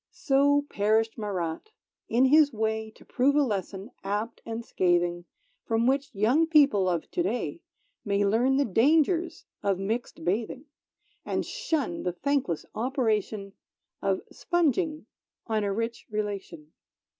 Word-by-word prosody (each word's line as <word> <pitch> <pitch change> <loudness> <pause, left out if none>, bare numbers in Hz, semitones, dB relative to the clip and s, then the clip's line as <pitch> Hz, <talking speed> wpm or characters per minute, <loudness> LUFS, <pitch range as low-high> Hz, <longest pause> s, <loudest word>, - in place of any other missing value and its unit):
So 285 -4 +2
perished 220 +1 +1
Marat. 195 - -4 0.4
In 245 +3 +4
his 295 +2 +5
way 220 -1 -2
To - - -19
prove 270 +3 +2
a 295 - +5
lesson, 200 -1 -4
apt 210 +4 -3
and 230 0 -5
scathing, 175 -2 +1 0.4
From 225 0 +1
which 275 +2 +1
young 250 +11 +3
people 275 - +4
of 170 -3 -2
to - - -1
day 185 -5 -2 0.4
May 200 0 +1
learn 240 +6 +3
the 280 - +3
dangers 320 - +2 0.2
of 195 -2 +1
mixed 220 +5 -4
bathing, 225 - -2 0.6
And - - -2
shun 280 - -2
the 180 - -2
thankless 270 - -1
operation 220 -5 -1 0.5
Of - - 0
sponging 325 -2 0 0.4
on 220 -2 0
a 200 - 0
rich 230 +3 -3
relation. 200 -7 -5
225 Hz, 135 wpm, -27 LUFS, 200-275 Hz, 0.6 s, his